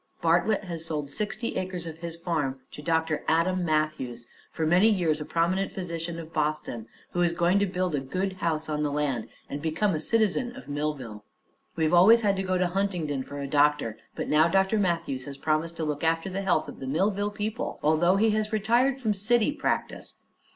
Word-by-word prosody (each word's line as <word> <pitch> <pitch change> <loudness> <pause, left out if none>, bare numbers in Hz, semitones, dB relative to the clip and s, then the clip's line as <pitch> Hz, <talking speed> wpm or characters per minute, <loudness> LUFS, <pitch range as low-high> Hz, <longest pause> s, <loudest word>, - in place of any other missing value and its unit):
Bartlett 175 +6 +2
has 170 -4 -4
sold 150 -3 -3
sixty 215 +6 -2
acres 185 -2 -3
of 160 -1 -7
his 170 -1 -5
farm 155 -6 -2
to - - -9
Dr. 160 -1 0
Adam 180 +3 +2
Matthews, 155 -7 -1 0.3
for 160 - -2
many 180 +7 +5
years 165 -7 +1
a - - -4
prominent 175 +5 0
physician 170 -2 -4
of 165 -1 -9
Boston, 150 -7 -2 0.2
who 175 - -1
is 175 -1 +3
going 175 +3 +3
to 200 - +2
build 180 -2 -1
a 145 - +1
good 185 +9 -2
house 160 -2 0
on 150 -1 -2
the 150 -1 0
land 140 -6 -1 0.2
and 145 - -5
become 165 +6 0
a 155 - -1
citizen 230 +6 +1
of - - -11
Millville. 145 -7 -4 0.5
We've 160 0 +1
always 215 +7 +7
had 200 -3 +2
to - - 0
go 185 -1 0
to 180 - +2
Huntingdon 175 -7 -1
for 145 - -8
a 140 -1 -4
doctor, 145 -6 +2 0.2
but - - -3
now 155 +2 +4
Dr. 195 +4 +2
Matthews 165 -9 -1
has 140 -1 -7
promised 160 +3 -1
to 165 - -2
look 150 0 -3
after 165 +3 +1
the 195 +2 -2
health 190 -2 +1
of - - -9
the 135 - -6
Millville 200 +8 +1
people, 210 +1 -4
although 160 +5 +4
he 220 +2 +3
has 215 +1 0
retired 240 +5 +2
from 220 -5 +1
city 220 +5 +2
practice. 295 - -3
170 Hz, 200 wpm, -27 LUFS, 150-195 Hz, 0.5 s, always